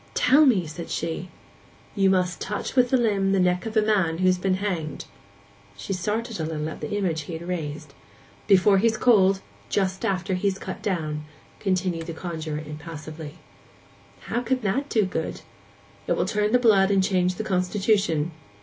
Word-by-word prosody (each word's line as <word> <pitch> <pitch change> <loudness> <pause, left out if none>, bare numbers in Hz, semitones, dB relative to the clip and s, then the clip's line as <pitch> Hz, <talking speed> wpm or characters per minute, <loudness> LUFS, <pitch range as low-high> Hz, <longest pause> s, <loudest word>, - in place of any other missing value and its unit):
'Tell 290 +4 +5
me!' 200 -9 +3
said 160 +2 -7
she. 165 +2 -3 0.7
'You 195 -2 +3
must 185 -1 +1
touch 210 +5 -4
with 250 -1 +4
the 260 - +4
limb 200 -5 +1
the 195 - +3
neck 180 +3 +1
of 220 0 -3
a 215 - +5
man 190 -7 +1
who's 185 0 +2
been 185 0 +1
hanged.' 180 -6 -3 0.7
She 195 - -4
started 215 +4 -2
a - - -1
little 155 -1 -3
at - - -9
the - - -3
image 170 -6 0
he 160 +3 -8
had 165 +2 -6
raised. 155 -4 -4 0.5
'Before 195 +1 +5
he's 225 +1 +2
cold—just 195 -3 +1
after 190 0 -1
he's 190 +1 0
cut 190 - -7
down,' 155 -6 -2 0.3
continued 185 -4 -1
the 165 - -4
conjuror 160 -3 -5
impassively. 155 0 -8 0.9
'How 240 - -2
can 255 +1 -1
that 245 +8 -1
do 215 -4 +2
good?' 170 -3 -4 0.7
'It - - +2
will - - 0
turn 210 +2 0
the 250 - +6
blood 210 -6 +4
and 195 -1 +3
change 185 -2 +1
the 220 - -4
constitution. 190 -4 +1
185 Hz, 170 wpm, -25 LUFS, 165-210 Hz, 0.9 s, the